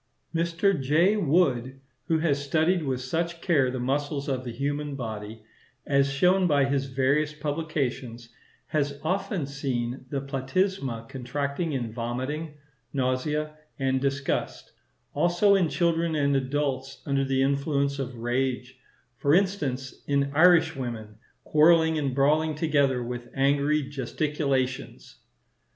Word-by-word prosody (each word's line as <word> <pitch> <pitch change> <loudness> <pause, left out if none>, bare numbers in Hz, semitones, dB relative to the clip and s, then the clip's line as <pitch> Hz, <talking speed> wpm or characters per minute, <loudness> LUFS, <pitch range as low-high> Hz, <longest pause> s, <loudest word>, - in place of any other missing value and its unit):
Mr. 170 +1 +1
J. 165 +10 +3
Wood, 135 - +1 0.3
who 165 - +2
has 145 -3 0
studied 160 +5 +2
with 130 -4 -2
such 165 +6 -2
care 150 -8 +2
the 130 0 -4
muscles 140 +3 -1
of 130 -2 -1
the 120 - -5
human 145 +3 -3
body, 110 -3 -6 0.4
as 140 -1 +2
shown 180 +6 +3
by 145 -4 +3
his 140 0 0
various 140 +3 +1
publications, 140 -6 -3 0.4
has 145 -2 -1
often 185 -1 -1
seen 130 -2 -3
the 140 - -2
platysma 135 - -2
contracted 140 +5 -3
in 120 -5 -3
vomiting, 130 +7 -4 0.4
nausea, 140 +4 -1 0.2
and 130 -1 0
disgust; 140 0 -2 0.4
also 175 +6 +3
in 185 -5 +3
children 170 -1 +1
and 140 -2 +2
adults 135 0 -2
under 140 -1 +1
the 135 0 +1
influence 140 0 0
of 130 -2 -4
rage,—for 125 +2 -2
instance, 145 -10 -1
in 140 -1 +1
Irishwomen, 135 -10 +2 0.2
quarrelling 160 +1 +4
and 135 -3 -1
brawling 155 +3 +2
together 140 -5 +1
with 120 0 -6
angry 140 +2 +2
gesticulations. 135 -1 -2
140 Hz, 120 wpm, -26 LUFS, 130-155 Hz, 0.4 s, quarrelling